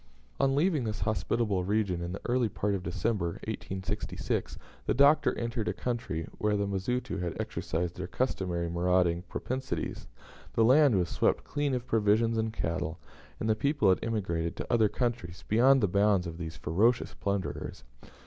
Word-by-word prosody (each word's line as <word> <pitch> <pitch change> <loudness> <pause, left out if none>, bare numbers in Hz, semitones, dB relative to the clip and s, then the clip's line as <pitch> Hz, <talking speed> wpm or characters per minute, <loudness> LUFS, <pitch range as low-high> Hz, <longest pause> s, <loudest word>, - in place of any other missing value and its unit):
On 135 0 +3
leaving 155 -2 +2
this 110 -1 -3
hospitable 105 0 0
region 100 -3 0
in 85 0 -4
the 95 - -6
early 120 -2 +2
part 105 0 -1
of 95 - -1
December, 90 0 -1
1866, 95 -1 -3 0.3
the - - +2
Doctor 140 +4 +5
entered 115 -2 -2
a - - 0
country 110 -10 -3
where 105 -1 +1
the 100 - 0
Mazitu 100 +1 -2
had 85 -2 -3
exercised 85 +1 -3
their 95 -1 -4
customary 90 -8 -1
marauding 85 0 +2
propensities. 130 +1 -4 0.5
The 115 - +4
land 135 -2 +6
was 90 -2 +1
swept - - +1
clean 145 -2 -1
of 125 -1 -3
provisions 115 0 +2
and 110 0 0
cattle, 80 -5 -2 0.4
and 110 - -2
the 110 - +4
people 140 -4 +2
had 95 - +4
emigrated 90 -7 -1
to - - -4
other 110 -3 +4
countries, 115 -9 -3
beyond 130 +5 +5
the 105 - +3
bounds 100 0 +3
of 85 0 -6
those 80 -2 -6
ferocious 110 +10 +1
plunderers. 75 -9 -3
105 Hz, 165 wpm, -30 LUFS, 90-120 Hz, 0.5 s, land